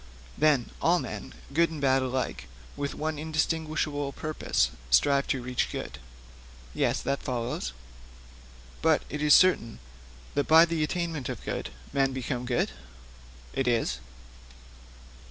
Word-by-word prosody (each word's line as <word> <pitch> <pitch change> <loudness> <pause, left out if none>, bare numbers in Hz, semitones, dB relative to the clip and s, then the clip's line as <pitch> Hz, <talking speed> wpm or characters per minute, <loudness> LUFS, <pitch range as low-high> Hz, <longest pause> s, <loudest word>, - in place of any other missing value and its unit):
'Then, 150 -5 +3
all 170 +2 +4
men, - - -5 0.2
good 170 +3 +4
and 160 -2 -6
bad 135 -1 +3
alike, 130 0 -2 0.3
with 140 0 -3
one 155 0 -2
indistinguishable 155 -2 -1
purpose 155 +2 0 0.2
strive 140 - +4
to 130 -3 -1
reach 125 0 -1
good?' - - -5 0.7
'Yes, - - 0
that 140 +1 -1
follows.' 120 - -3 1.1
'But 160 -2 +3
it 150 - -3
is 150 -1 +7
certain 180 - +4 0.6
that 145 - 0
by 160 +1 +8
the 165 -2 -1
attainment 165 -4 -2
of - - -6
good - - -3 0.2
men 135 -1 +2
become 125 -1 -3
good?' 120 -1 +1 0.8
'It 135 - 0
is.' 115 - +1
145 Hz, 130 wpm, -28 LUFS, 130-155 Hz, 1.1 s, by